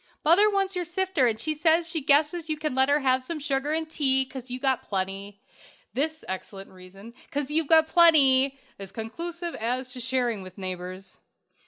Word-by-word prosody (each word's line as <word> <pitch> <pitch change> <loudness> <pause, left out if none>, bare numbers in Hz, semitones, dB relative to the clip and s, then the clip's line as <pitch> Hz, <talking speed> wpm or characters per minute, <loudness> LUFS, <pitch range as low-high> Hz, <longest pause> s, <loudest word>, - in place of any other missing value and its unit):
"'Mother 375 +7 +6
wants 390 -2 -1
your 360 - -1
sifter, 350 -5 0
and 220 -2 -1
she 310 +6 -1
says 325 +2 +2
she 330 -2 -2
guesses 300 +4 +2
you 310 - -1
can 305 -2 -3
let 265 +1 +2
her 290 +1 +3
have 260 -1 +1
some 325 +5 -4
sugar 280 0 -2
and 320 0 -1
tea, 265 -4 +1
'cause 260 -1 -10
you've 250 +2 -6
got 265 -2 +2
plenty.' 195 +1 -4 0.5
This 310 +3 -2
excellent 195 +1 -7
reason, 190 +4 -14 0.2
''cause 290 0 -3
you've 315 0 +1
got 320 -1 +6
plenty,' 275 -6 +5 0.2
is 195 -1 -9
conclusive 335 - -5
as 250 +3 -3
to 255 - -7
sharing 245 -4 -1
with 185 0 -12
neighbors. 185 0 -7
270 Hz, 185 wpm, -26 LUFS, 225-320 Hz, 0.5 s, Mother